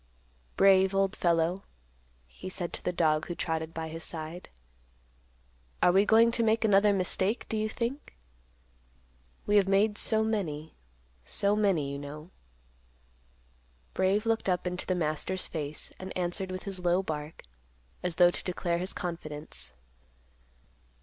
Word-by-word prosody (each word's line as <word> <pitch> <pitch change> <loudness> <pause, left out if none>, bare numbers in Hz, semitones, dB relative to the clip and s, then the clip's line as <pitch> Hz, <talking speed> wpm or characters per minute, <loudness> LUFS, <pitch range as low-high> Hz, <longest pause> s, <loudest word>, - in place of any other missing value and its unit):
"Brave, 190 0 +5
old 195 +1 +2
fellow," 170 +2 +1 0.6
he 185 - -9
said 175 -2 -3
to - - -5
the 180 - 0
dog 155 -3 +1
who 175 - -4
trotted 160 -1 -2
by 165 -1 -5
his 165 +1 -7
side; 165 +2 -4 1.3
"are 180 - +5
we 195 +3 +4
going 230 +1 +6
to 230 - 0
make 225 0 +2
another 205 0 +5
mistake, 195 +3 0
do - - -3
you 215 0 0
think? 240 +6 -4 1.3
We 205 - +3
have 195 -2 +4
made 205 +2 +2
so 220 -1 +1
many, 165 -9 -2 0.5
so 200 - +1
many, 190 -10 +1
you 140 - -5
know." 150 +4 -9 1.6
Brave 195 +3 +1
looked 225 -3 0
up 180 0 0
into 180 0 -3
the 185 - +1
master's 175 +3 -1
face, 150 -2 -5
and 185 0 -6
answered 180 +1 -2
with 185 0 -5
his 195 -3 -5
low 175 +2 +2
bark, 150 -2 -5 0.6
as 180 -2 -2
though 175 0 +6
to - - -3
declare 175 -1 -1
his 185 +2 -2
confidence. 155 -4 -6
185 Hz, 145 wpm, -29 LUFS, 165-200 Hz, 1.6 s, going